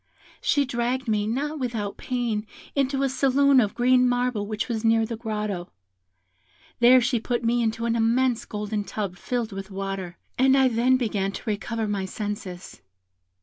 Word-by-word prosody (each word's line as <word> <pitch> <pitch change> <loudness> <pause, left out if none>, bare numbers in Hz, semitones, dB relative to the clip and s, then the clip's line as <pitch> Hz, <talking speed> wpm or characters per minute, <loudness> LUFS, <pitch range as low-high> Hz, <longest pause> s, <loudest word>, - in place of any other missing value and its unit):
She 295 - +2
dragged 250 +1 -2
me, 210 -1 +1
not 290 +7 -2
without 225 -6 -3
pain, 235 -4 -2 0.3
into 275 0 +1
a - - +3
saloon 270 +1 +4
of 205 -3 -1
green 250 0 +4
marble 245 -4 0
which 215 0 -3
was 230 -3 -3
near 225 0 +3
the 230 - -4
grotto; 210 -5 -4 1.1
she 250 0 +5
there - - -14
put 240 0 -1
me 235 +1 +2
into 225 0 -1
an 230 0 +1
immense 235 +1 +2
golden 210 -1 -3
tub 200 -3 -4
filled 235 +2 -3
with 195 0 -7
water, 195 -2 -5 0.2
and 265 +1 +5
I 265 -1 +5
then 245 +2 +3
began 205 -5 -1
to - - -7
recover 220 +1 -2
my 200 -2 -1
senses. 200 -2 -6
230 Hz, 165 wpm, -25 LUFS, 210-255 Hz, 1.1 s, she